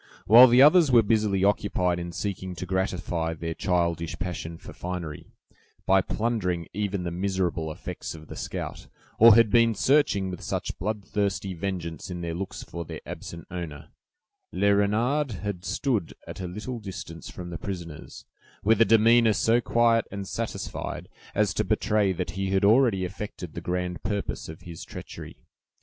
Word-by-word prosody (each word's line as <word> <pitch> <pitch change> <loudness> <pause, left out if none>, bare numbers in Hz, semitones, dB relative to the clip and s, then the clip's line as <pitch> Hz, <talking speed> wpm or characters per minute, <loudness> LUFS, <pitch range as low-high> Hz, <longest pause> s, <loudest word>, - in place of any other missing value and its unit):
While 120 +4 +10
the 125 +2 +7
others 155 -1 +6
were 120 -2 +6
busily 105 -3 +1
occupied 90 -3 +1
in 85 0 -5
seeking 95 0 -4
to 90 - -5
gratify 90 -3 -1
their 80 +1 -4
childish 85 -2 -1
passion 85 -2 -5
for - - -11
finery, 90 -4 -6 0.6
by 95 0 +5
plundering 95 -6 -1
even 100 -1 -2
the 85 - -3
miserable 90 -3 -1
effects 75 - -6
of 80 -1 -11
the - - -8
scout, - - -6 0.3
or 115 -1 +9
had 115 -2 +5
been 115 0 +4
searching 100 -6 +2
with 90 - -7
such - - -3
bloodthirsty 100 -1 -2
vengeance 85 -2 -4
in 90 -1 -5
their 85 -1 -3
looks 95 +3 -5
for 85 +1 -6
their - - -8
absent 85 -1 -8
owner, 80 -3 -6 0.6
Le 100 0 +3
Renard 115 +7 +1
had 100 -4 -4
stood 110 - -1
at - - -8
a 90 - -3
little 105 +7 -5
distance 95 -5 -8
from 90 -1 -8
the 85 - -5
prisoners, 85 -6 -7 0.4
with 110 +1 +4
a - - +8
demeanor 115 +1 +5
so 115 +5 +3
quiet 115 -1 +3
and 100 -1 -6
satisfied, - - -5 0.3
as - - +2
to - - 0
betray 105 -2 +1
that 90 0 -3
he 95 0 -3
had 95 +1 +2
already 110 -4 +4
effected 90 -3 -7
the 85 - -6
grand 90 0 -3
purpose 100 -5 -3
of 80 - -9
his 85 -2 -9
treachery. - - -10
95 Hz, 165 wpm, -26 LUFS, 85-105 Hz, 0.6 s, While